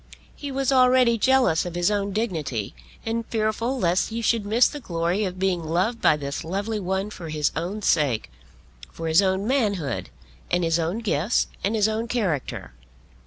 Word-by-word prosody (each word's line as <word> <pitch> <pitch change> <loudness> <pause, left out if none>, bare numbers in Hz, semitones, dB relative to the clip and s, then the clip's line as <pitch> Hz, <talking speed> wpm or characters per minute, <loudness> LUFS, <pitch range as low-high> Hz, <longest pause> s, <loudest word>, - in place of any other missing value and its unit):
He 285 -1 -6
was 270 0 0
already 255 -3 +4
jealous 260 -10 +3
of 175 -1 -6
his 175 +3 +2
own 200 -1 -1
dignity, 160 - -2 0.3
and 230 +1 -1
fearful 225 +3 -1
lest 180 -5 +1
he 230 +1 -4
should 225 -3 +1
miss 230 +4 +5
the 295 - -6
glory 175 -1 -1
of 185 -1 -4
being 185 -2 0
loved 180 +9 0
by 150 - +4
this 140 -1 -4
lovely 200 +6 -2
one 190 +2 -2
for 170 -6 -8
his 150 -1 0
own 185 +7 -3
sake, 140 - +1 0.6
for 165 - -5
his 160 +4 +5
own 190 +1 0
manhood, 205 - -1 0.4
and 175 - +1
his 165 0 +2
own 170 +8 -1
gifts 205 - +1
and 205 +3 +1
his 215 -1 +3
own 220 +2 -2
character. 185 - -2
200 Hz, 175 wpm, -24 LUFS, 170-230 Hz, 0.6 s, miss